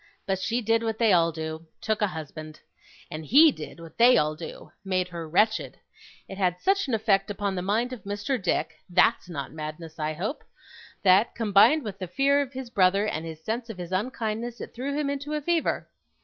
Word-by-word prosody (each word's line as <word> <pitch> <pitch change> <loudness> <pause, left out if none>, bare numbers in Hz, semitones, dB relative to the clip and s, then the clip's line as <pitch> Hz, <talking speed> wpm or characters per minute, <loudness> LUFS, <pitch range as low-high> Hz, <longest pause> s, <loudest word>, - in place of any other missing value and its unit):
But 190 -1 -1
she 230 +6 -1
did 225 0 +2
what 225 -1 -2
they 225 -4 +4
all 170 -1 +4
do 160 0 -6
took 220 -1 -1
a 210 - +3
husband. 155 -2 -8 0.5
And 155 -1 -5
HE 290 - +7
did 155 - -9
what 165 +2 -13
they 245 +2 +7
all 155 0 +2
do 160 +2 -9
made 185 -2 -1
her 170 -2 -7
wretched. 215 +7 +1 0.5
It 195 - -8
had 180 -2 +1
such 395 - +1
an 250 - +1
effect 205 -3 +2
upon 200 -1 -2
the 180 - -2
mind 225 +7 0
of 250 - -8
Mr. 205 +5 -2
Dick 165 -3 -1
(that's 185 +3 +3
not 140 -5 -5
madness, 155 +1 -7
I 155 0 -1
hope!) 200 - -4 0.6
that, 195 +3 +4
combined 225 +8 +5
with 205 -4 -6
his 185 -3 -5
fear 280 +7 +3
of 280 -1 -5
his 260 -2 -7
brother, 195 0 +3
and 165 -5 -3
his 160 -1 -9
sense 230 +4 -3
of 220 - -7
his 175 -1 -7
unkindness, 225 +3 -2
it - - -8
threw 275 +4 -3
him 300 -1 0
into 285 +1 -3
a 300 - -2
fever. 335 +2 0
200 Hz, 205 wpm, -26 LUFS, 170-235 Hz, 0.6 s, HE